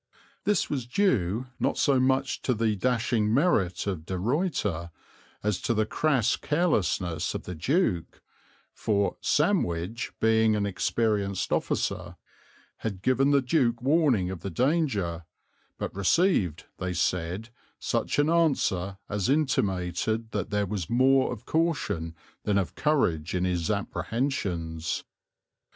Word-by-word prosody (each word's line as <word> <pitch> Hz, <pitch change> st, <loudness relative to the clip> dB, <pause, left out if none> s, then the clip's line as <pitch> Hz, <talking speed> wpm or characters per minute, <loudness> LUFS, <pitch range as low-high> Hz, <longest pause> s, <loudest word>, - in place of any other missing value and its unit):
This 205 Hz, -4 st, +2 dB
was 130 Hz, -5 st, -3 dB
due 120 Hz, -, +1 dB
not -, -, 0 dB
so 135 Hz, -2 st, +3 dB
much 130 Hz, +1 st, +1 dB
to 125 Hz, -, 0 dB
the 110 Hz, -1 st, +1 dB
dashing 115 Hz, -1 st, +1 dB
merit 115 Hz, -, +2 dB
of 90 Hz, -6 st, -4 dB
De 95 Hz, -, -2 dB
Ruyter 105 Hz, -, -1 dB, 0.5 s
as 105 Hz, -3 st, 0 dB
to 115 Hz, -, 0 dB
the 110 Hz, 0 st, +2 dB
crass 135 Hz, -1 st, +1 dB
carelessness 95 Hz, -, 0 dB
of -, -, -4 dB
the 90 Hz, -, -6 dB
Duke, 90 Hz, -, 0 dB, 0.5 s
for 100 Hz, -2 st, 0 dB
"Sandwich, 115 Hz, -, 0 dB
being 110 Hz, -1 st, +3 dB
an 105 Hz, -1 st, 0 dB
experienced 100 Hz, 0 st, 0 dB
officer, -, -, -1 dB, 0.6 s
had 100 Hz, -4 st, -5 dB
given 130 Hz, +2 st, +3 dB
the 140 Hz, -2 st, +4 dB
Duke 125 Hz, -4 st, +2 dB
warning 130 Hz, -, +2 dB
of 95 Hz, -, -6 dB
the 100 Hz, -, -5 dB
danger; 105 Hz, -, 0 dB, 0.5 s
but -, -, -4 dB
received, 100 Hz, -, +2 dB
they 90 Hz, -1 st, -2 dB
said, 90 Hz, +5 st, -1 dB, 0.3 s
such -, -, -1 dB
an 145 Hz, +1 st, +3 dB
answer 130 Hz, -, +1 dB
as 105 Hz, 0 st, -1 dB
intimated 110 Hz, -, 0 dB
that 105 Hz, -, -2 dB
there 105 Hz, 0 st, 0 dB
was 95 Hz, -4 st, -4 dB
more 130 Hz, +2 st, +4 dB
of 120 Hz, -4 st, -7 dB
caution 105 Hz, -, -1 dB, 0.3 s
than 105 Hz, -1 st, +1 dB
of 95 Hz, -3 st, -1 dB
courage 90 Hz, -, +1 dB
in 90 Hz, 0 st, +1 dB
his 90 Hz, -3 st, -1 dB
apprehensions." 100 Hz, -, -2 dB
110 Hz, 130 wpm, -27 LUFS, 90-135 Hz, 0.6 s, the